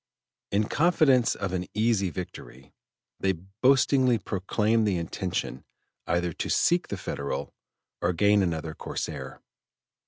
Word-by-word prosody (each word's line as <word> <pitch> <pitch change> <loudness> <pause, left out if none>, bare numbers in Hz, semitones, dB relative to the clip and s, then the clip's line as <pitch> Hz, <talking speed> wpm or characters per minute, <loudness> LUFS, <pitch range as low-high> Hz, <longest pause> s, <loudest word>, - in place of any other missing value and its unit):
In 100 +2 +2
confidence 145 -7 +3
of 100 -2 -4
an 90 -1 -2
easy 105 -3 +2
victory, 70 -7 -9 0.5
they 95 0 +2
boastingly 125 - +2
proclaimed 105 +3 0
the 95 -3 +1
intention 85 -4 -3 0.4
either 85 -1 0
to - - -4
sink 175 +1 +2
the - - -4
Federal 70 0 -4 0.5
or 85 - +2
gain 100 +3 +3
another 80 -3 -2
corsair. - - -6
100 Hz, 120 wpm, -27 LUFS, 90-115 Hz, 0.5 s, confidence